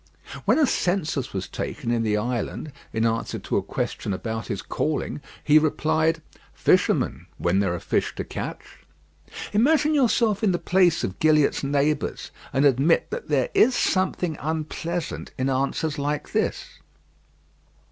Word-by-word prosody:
When - - +4
a 310 - +5
census 175 - -1
was 95 -1 -4
taken 115 - -4
in 120 -1 +1
the 105 -2 +1
island, 120 +6 -3 0.2
in 110 0 0
answer 115 0 -1
to - - -2
a - - +2
question 100 - -3
about 110 +3 -4
his 100 -1 -4
calling, 150 -1 -2 0.2
he 155 +1 +6
replied, 160 +1 +1 0.3
"Fisherman; - - +2
when 90 +2 +1
there 95 -3 +1
are - - -4
fish - - -1
to - - -3
catch." - - -6 0.9
Imagine 300 +7 +3
yourself 230 -6 +2
in 195 -4 +3
the - - +1
place 175 -2 +2
of 95 0 -4
Gilliatt's 155 -3 +3
neighbours, 145 +2 0 0.2
and 135 +2 +2
admit 140 +5 +3
that 475 0 -5
there - - +2
is 390 -11 +5
something 185 -6 0
unpleasant 160 +3 -3
in 130 0 0
answers 140 +3 -1
like 145 +1 -2
this. - - -2
155 Hz, 145 wpm, -24 LUFS, 125-180 Hz, 0.9 s, he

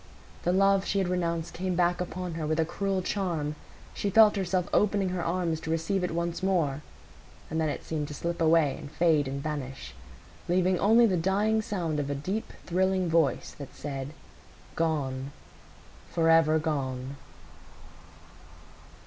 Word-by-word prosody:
The 175 - +1
love 195 +1 +4
she 200 - -1
had 190 -2 +1
renounced 170 -2 -1
came 185 0 -2
back 175 0 +2
upon 180 -1 -4
her 160 -2 -3
with 155 +1 0
a 160 - +3
cruel 190 +2 -2
charm; 170 -7 -1 0.4
she 200 - -2
felt 215 +1 +6
herself 185 -2 0
opening 200 -2 +2
her 180 -1 -2
arms 170 -2 -1
to 160 - -7
receive 165 +4 0
it 180 - 0
once 170 +1 -2
more; 165 -7 +1 0.7
and 160 +1 0
then 155 - +1
it - - -4
seemed 150 -2 -3
to 150 - -7
slip 170 +2 -3
away 160 -3 +4
and 145 - -8
fade 155 -4 +2
and 140 +1 -4
vanish, 135 - -5 0.6
leaving 180 +1 +2
only 225 +3 +5
the 190 -5 +2
dying 205 +5 +2
sound 175 -8 -2
of 140 -1 -2
a 145 - -1
deep, 190 +10 -3
thrilling 185 0 +1
voice 160 -3 +1
that 140 - -9
said, 135 -2 -5 0.7
"Gone, 140 -5 -1 0.8
forever 165 -2 +4
gone." 135 -4 -3
170 Hz, 155 wpm, -28 LUFS, 155-185 Hz, 0.8 s, felt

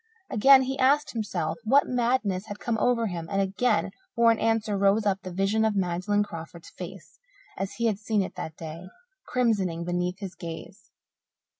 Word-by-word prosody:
Again 265 +5 +7
he 265 +1 -3
asked 285 +3 +3
himself 190 -8 -3
what 270 +6 +4
madness 235 -6 0
had 205 - -6
come 235 +1 -2
over 240 -1 +2
him, 170 -5 -4
and 195 - 0
again 200 +2 +1 0.2
for 235 0 +5
an 225 - 0
answer 225 -2 +1
rose 200 +2 +3
up 195 -1 +1
the 185 - -7
vision 195 +4 +1
of 220 -1 +1
Magdalen 190 +2 +1
Crawford's 165 -3 -9
face - - -10 0.4
as 195 0 -4
he 235 - -2
had 215 -3 +1
seen 215 -2 0
it - - -6
that 160 - -6
day, 165 +2 -8 0.4
crimsoning 195 -9 0
beneath 180 +1 -1
his 195 -2 -7
gaze. 165 -2 -9
205 Hz, 175 wpm, -27 LUFS, 180-230 Hz, 0.4 s, Again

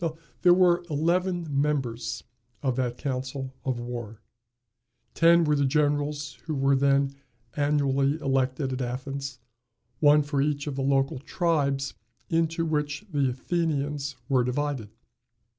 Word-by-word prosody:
There 175 -1 +7
were 180 -1 +4
eleven 175 +3 +1 0.2
members 120 -6 -2 0.4
of 130 -2 +1
that 125 -2 -1
council 130 -1 -4
of 130 -3 -1
war. 120 -3 -6 0.9
Ten 170 0 +5
were 150 -1 +2
the 140 - +2
generals 145 -1 0
who 155 -2 -2
were 135 0 +3
then 140 0 +2 0.4
annually 145 0 +1
elected 135 -1 0
at 130 - -3
Athens, 135 +2 -4 0.6
one 150 0 +6
for 145 -1 -1
each 145 0 0
of 145 -3 -4
the 135 - -2
local 135 -1 +1
tribes 140 -3 0 0.4
into 165 0 +1
which 150 +3 -2
the 140 -3 +2
Athenians 145 0 -2
were 130 -3 +3
divided. 130 -3 -2
140 Hz, 125 wpm, -27 LUFS, 130-150 Hz, 0.9 s, There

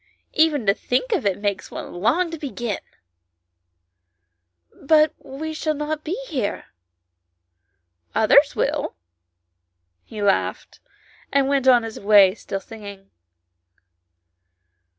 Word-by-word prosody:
Even 305 -6 +2
to 200 - +4
think 250 - -2
of 370 - +1
it 190 - 0
makes 205 -2 -3
one - - -8
long 320 - +1
to 330 - -6
begin." 240 -7 -4 1.1
" 85 -1 -33
But 310 -1 +6
we 315 +4 -7
shall 310 0 -2
not 300 +1 -3
be 360 +9 -3
here." 255 - -3 0.8
" 85 -1 -42
Others - - +5
will;" - - -1 1.1
he 215 - -10
laughed, 200 -1 -1 0.5
and 275 -1 +2
went 275 -1 +1
on 245 -2 +6
his 225 -1 -7
way 200 -2 +6
still 195 -2 -5
singing. 200 -3 -11
215 Hz, 115 wpm, -22 LUFS, -, 1.1 s, But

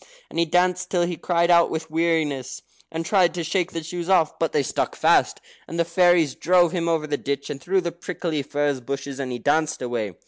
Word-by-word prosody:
And - - -3
he 170 - +3
danced 180 +2 +1
till 175 -2 +1
he 175 0 -2
cried 170 +1 +1
out 170 -1 +5
with 160 0 -5
weariness, 155 -5 -1 0.3
and 165 0 -4
tried 185 -2 +3
to 175 - -2
shake 180 +2 -1
the 165 - -5
shoes 175 +2 -5
off. 170 -5 +2
But 165 - 0
they 145 - +1
stuck - - -2
fast, - - +3 0.3
and 165 - -6
the 170 - +2
fairies 170 -4 +3
drove 175 0 +3
him 170 -2 -1
over, 160 -2 0
the 145 -1 -2
ditch, 140 0 -3
and 135 - -7
through 190 +4 +1
the 170 -1 -3
prickly 170 -3 -4
furze 145 0 -1
bushes, 135 +2 -5
and 130 -2 -3
he 125 - -3
danced 155 +5 0
away. 115 -7 -3
165 Hz, 220 wpm, -23 LUFS, 145-175 Hz, 0.3 s, out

